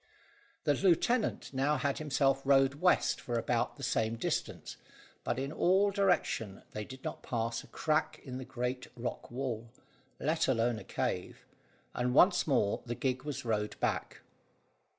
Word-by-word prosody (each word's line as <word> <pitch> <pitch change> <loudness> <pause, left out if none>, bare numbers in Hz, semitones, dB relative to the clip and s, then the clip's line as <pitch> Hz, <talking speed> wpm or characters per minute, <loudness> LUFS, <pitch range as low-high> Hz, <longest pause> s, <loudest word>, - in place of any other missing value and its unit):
The 145 - +3
lieutenant 195 - +2
now 140 +3 +2
had 140 -2 -1
himself 135 -2 +2
rowed 135 +1 +3
west 180 0 +3
for 120 -1 -2
about 115 0 0
the 140 - -10
same 115 -3 +1
distance, 115 - -3 0.5
but - - -1
in 135 +2 -2
this 195 +5 +3
direction 175 - +1
they 105 - -4
did 130 +4 -11
not - - -5
pass 115 -1 -2
a - - -15
crack 155 0 0
in 130 -2 -6
the - - -5
great 125 0 -3
rock 120 +1 -4
wall, 120 -2 -4 0.5
let 160 +3 +1
alone 120 -2 +1
a - - -10
cave, - - -3 0.5
and 125 +1 0
once 180 +1 +5
more 125 -8 +2
the 120 - -2
gig 130 0 -1
was 140 -3 -4
rowed 105 -2 -1
back. - - -2
130 Hz, 155 wpm, -32 LUFS, 120-150 Hz, 0.5 s, once